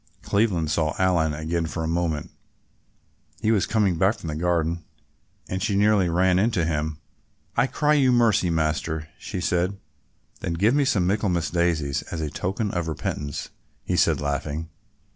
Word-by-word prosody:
Cleveland 95 -7 +1
saw 80 -1 0
Aline 85 -5 +2
again 80 +2 -2
for 80 +1 -4
a - - -1
moment. 80 -2 -1 1.1
He 110 - +1
was 105 -4 +2
coming 100 -7 +1
back 95 +5 +3
from 80 - -6
the 75 - -3
garden 85 0 0 0.6
and 95 0 -3
she 100 - 0
nearly 100 -3 +3
ran 90 +2 +3
into 100 -5 +2
him. 75 -1 -1 0.6
"I 125 - +3
cry 150 +2 +1
you 135 -4 +4
mercy, 115 -7 +3
Master," 80 0 -1
she - - -5
said. 90 +3 0 0.6
"Then 85 - -3
give 105 +8 +3
me 145 0 +3
some 105 -10 +2
Michaelmas 95 -3 0
daisies 85 -5 +1
as 85 - -3
a 75 -2 -3
token 100 +5 -2
of 85 -2 -2
repentance," 75 -2 -4 0.3
he - - -1
said - - +3
laughing. 75 +2 -3
85 Hz, 160 wpm, -24 LUFS, 80-100 Hz, 1.1 s, you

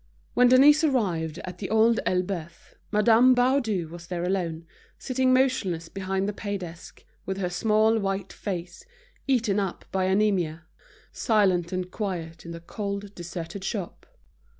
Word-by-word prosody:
When 250 - +5
Denise 285 +5 +6
arrived 180 - 0
at 180 - -8
The 195 - -4
Old 220 +2 +4
Elbeuf, 180 -3 -3 0.2
Madame 225 +4 +5
Baudu 245 - +1
was 170 0 -10
there 175 -1 -3
alone, 175 -3 -2 0.3
sitting 260 0 0
motionless 225 -11 +1
behind 190 0 -2
the 210 - -2
pay 205 0 -4
desk, 170 -2 -10 0.2
with 190 0 -2
her 180 -2 -2
small 220 +3 +2
white 195 -1 -3
face, 175 -3 -5 0.4
eaten 230 -6 +2
up 195 -3 -3
by 190 -1 0
anaemia, 190 -5 +1 0.5
silent 190 -6 +2
and 185 0 -3
quiet 170 -6 -5
in - - -6
the 165 - -7
cold, 200 +2 -5
deserted 175 +2 -7
shop. 195 -4 -5
195 Hz, 145 wpm, -26 LUFS, 175-220 Hz, 0.5 s, Denise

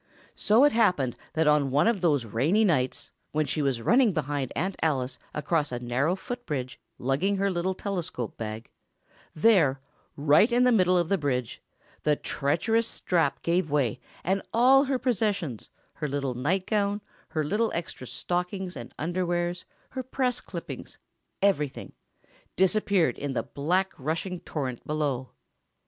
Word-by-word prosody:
So 220 +5 +4
it 290 - +6
happened 165 - +2 0.2
that 160 0 +2
on 150 -2 +4
one 140 +3 +3
of 230 -5 +1
those 145 -8 +2
rainy 150 - +2
nights, 130 -9 0 0.2
when 155 0 +1
she 150 - -2
was 135 -5 0
running 235 - +4
behind 145 -4 -2
Aunt 190 +5 -1
Alice, 130 -5 0
across 150 0 0
a 120 - -2
narrow 130 +8 0
foot 245 +5 -6
bridge, 130 -4 -3 0.2
lugging 145 +11 0
her 200 0 +1
little 185 +1 -1
telescope 175 - -4
bag—there, 135 - -1 0.4
right 150 - +4
in 245 +1 +4
the 250 - +5
middle 185 -5 +4
of 175 -2 +1
the 195 +1 +1
bridge—the 140 +2 -3
treacherous 220 +14 0
strap 165 -9 0
gave 170 -1 +1
way, 140 -6 +1 0.2
and 190 +3 +1
all 265 +4 +6
her 270 -1 0
possessions—her 200 - -2
little 140 -2 -2
nightgown, 195 - 0 0.3
her 155 -2 -1
little 210 +9 +1
extra 165 -6 -5
stockings 180 +8 -3
and 120 - -9
underwears, 175 +1 -1 0.3
her 260 - -3
press 255 -1 -1
clippings, - - -8 0.5
everything—disappeared 190 +3 0
in 140 -1 -3
the - - -1
black, 180 +7 0
rushing 165 +6 -2
torrent 130 -8 -4
below. 145 -4 -1
170 Hz, 140 wpm, -27 LUFS, 140-200 Hz, 0.5 s, it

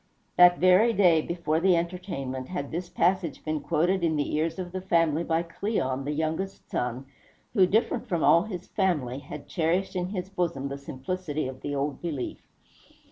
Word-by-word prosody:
That 180 0 +7
very 185 +6 +5
day, 175 -6 +5
before 170 -1 -1
the 185 +1 +4
entertainment, 170 -7 -4
had 145 -6 -4
this 175 +2 -4
passage 175 -3 0
been 155 0 -1
quoted 175 +5 +1
in 160 -2 +2
the 145 -1 -1
ears 155 +3 0
of 180 -2 -5
the 185 0 -4
family 165 -3 +2
by 165 0 0
Cleon, 165 - -2
the 145 - -1
youngest 160 +5 -3
son, 125 +2 -2 0.5
who, 190 -5 +5
different 225 +5 +1
from 170 -4 0
all 170 - +6
his 185 -5 -6
family, 150 - 0
had 140 +1 -9
cherished 180 +3 0
in 180 -1 -1
his 185 -2 -4
bosom 170 -8 -2
the 140 - -5
simplicity 150 +2 -4
of 130 0 -8
the 145 0 -3
old 140 0 -2
belief. 150 -7 -4
170 Hz, 180 wpm, -27 LUFS, 145-185 Hz, 0.5 s, That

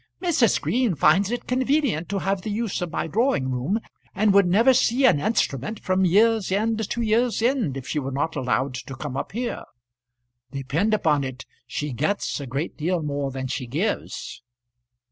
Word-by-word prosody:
"Mrs. 330 -10 +2
Green 240 -6 0
finds 160 +8 +4
it 240 +1 -3
convenient 260 - 0
to 200 - -1
have 195 0 -1
the 215 - -5
use 210 -2 -2
of 175 -2 -3
my - - -2
drawing 205 - +1
room, 135 - -1 0.4
and 205 +1 +3
would 200 -2 +5
never 225 +9 +5
see 255 +1 +3
an 190 - +5
instrument 175 - -1
from 185 0 +1
year's 215 +2 +3
end 220 +2 0
to 235 - -1
year's 230 +2 +2
end 235 - +1
if 130 -1 -7
she 140 +4 -1
were 135 -1 -4
not 145 +5 -2
allowed 130 0 0
to 130 +1 -7
come 130 -1 -6
up 135 - -4
here. 240 +2 -3 0.9
Depend 145 - 0
upon 150 -8 +1
it 130 0 -6 0.2
she 150 -2 -4
gets 155 - -1
a 140 - -6
great 140 +6 -3
deal 170 +1 -1
more 145 -1 -2
than 130 0 -5
she 130 -1 -4
gives." 170 - -3
185 Hz, 185 wpm, -24 LUFS, 140-225 Hz, 0.9 s, would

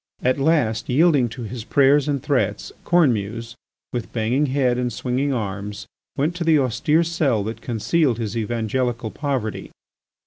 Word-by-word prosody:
At 130 +2 +2
last, 135 -7 +1
yielding 140 -2 +4
to 120 +2 -7
his 115 +1 -6
prayers 140 +3 +3
and 140 -3 -1
threats, 105 -8 -1
Cornemuse, 115 - +1 0.4
with 120 -2 -4
banging 120 +6 +1
head 130 -2 +1
and 125 -1 -1
swinging 130 +5 -1
arms, 100 -3 -4 0.3
went 155 +5 0
to 175 - -2
the 160 -2 +4
austere 150 +5 +2
cell 150 -10 0
that 110 +2 -5
concealed 125 +3 +1
his 110 -2 -4
evangelical 115 +1 -2
poverty. 135 -7 -3
125 Hz, 145 wpm, -22 LUFS, 110-145 Hz, 0.4 s, yielding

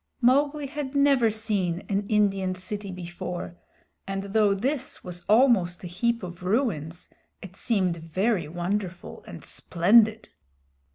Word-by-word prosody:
Mowgli 285 +4 +3
had 285 -1 -5
never 280 -5 +4
seen 205 -5 -1
an 200 0 -1
Indian 195 -3 +2
city 200 +2 -5
before, 175 0 -6 0.5
and 195 0 -4
though 210 -2 +4
this 260 +6 -3
was 175 -1 -7
almost 215 -7 +4
a - - -4
heap 230 +6 -1
of 175 -1 -8
ruins 180 - -1 0.4
it 190 -1 -10
seemed 190 -6 0
very 175 +2 -1
wonderful 175 +2 -4
and - - -9
splendid. 215 +5 +3
200 Hz, 125 wpm, -26 LUFS, 180-230 Hz, 0.5 s, never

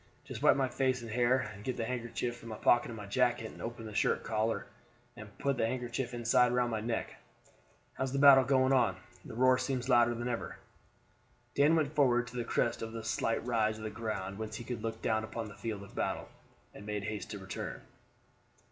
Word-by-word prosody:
Just - - -8
wipe - - +6
my 135 -1 +1
face 130 -1 0
and 115 - -7
hair, 120 +2 +3 0.2
and 100 +1 -12
get 130 - -3
the 115 - -1
handkerchief 120 0 -3
from 115 -1 -11
the 110 - -5
pocket 120 +3 +3
of 115 - -7
my 105 - -7
jacket, 120 +1 +1
and - - -12
open 115 0 -6
the 110 - -7
shirt - - +1
collar 110 0 -1 0.5
and 110 -3 -11
put 140 -1 0
the 115 - +2
handkerchief 125 +1 -3
inside 120 0 +3
round 125 -1 +1
my 110 -1 -1
neck. 115 +1 -3 0.8
How 130 - -2
is 130 - -4
the 140 - -1
battle 135 -1 +8
going 130 0 +3
on? 115 -8 +3 0.3
The - - -9
roar 130 +1 +4
seems 130 -1 -2
louder 120 -1 +5
than 120 +1 -3
ever." 120 -2 -4 1.0
Dan 145 +3 +4
went 155 -2 +1
forward 125 -5 +3
to 125 - -13
the 120 - -1
crest 115 0 0
a 115 - -2
of 110 0 -7
slight 115 +1 -1
rise 110 -3 +1
of 110 - -9
the 110 - -4
ground 105 -3 -4
whence 110 0 -5
he 120 - -6
could 120 -1 -5
look 110 0 -4
down 110 -1 +1
upon 110 0 -5
the - - -10
field 100 -1 -5
of 100 - -13
battle, - - -2 0.4
and - - -11
made 105 -1 -3
haste 105 -1 -4
to 105 - -5
return. 95 -1 -6
120 Hz, 220 wpm, -32 LUFS, 110-125 Hz, 1.0 s, battle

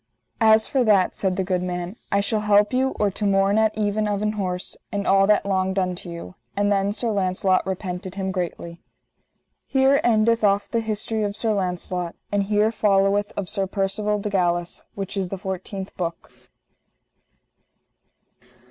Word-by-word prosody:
As 220 -1 +5
for 265 -2 +1
that, 200 -5 +3
said 190 -2 -1
the 190 - 0
good 180 -1 -1
man, 180 +1 -4 0.2
I 200 - +3
shall 215 +2 -1
help 210 +1 +3
you 265 +1 +1
or 205 -1 +2
to 210 - -6
morn 200 +1 +3
at 220 -1 +1
even 210 0 0
of 205 0 -1
an 210 - +1
horse, 185 -4 -4 0.2
and 200 -1 -2
all 195 0 +4
that 210 -1 +3
longed 190 -1 0
unto 180 -2 -2
you. 170 - -8 0.2
And 205 0 +2
then 200 0 +2
Sir 225 +2 -2
Launcelot 185 -1 +1
repented 185 -1 -4
him 190 -1 -2
greatly. 170 -2 -5 0.9
_Here 270 +1 +4
endeth 230 0 +3
off 200 0 +3
the 230 - +1
history 220 0 -2
of 205 -1 -1
Sir 220 0 0
Launcelot. 180 -2 -2 0.2
And 205 0 +2
here 210 +2 +2
followeth 205 -1 +2
of 200 - -2
Sir 195 -1 -1
Percivale 205 +2 -1
de 205 0 -4
Galis, 175 -2 0
which 195 0 -5
is 190 -2 -2
the 195 - -4
fourteenth 190 +1 -6
book. 170 -2 -4
200 Hz, 170 wpm, -23 LUFS, 185-210 Hz, 0.9 s, As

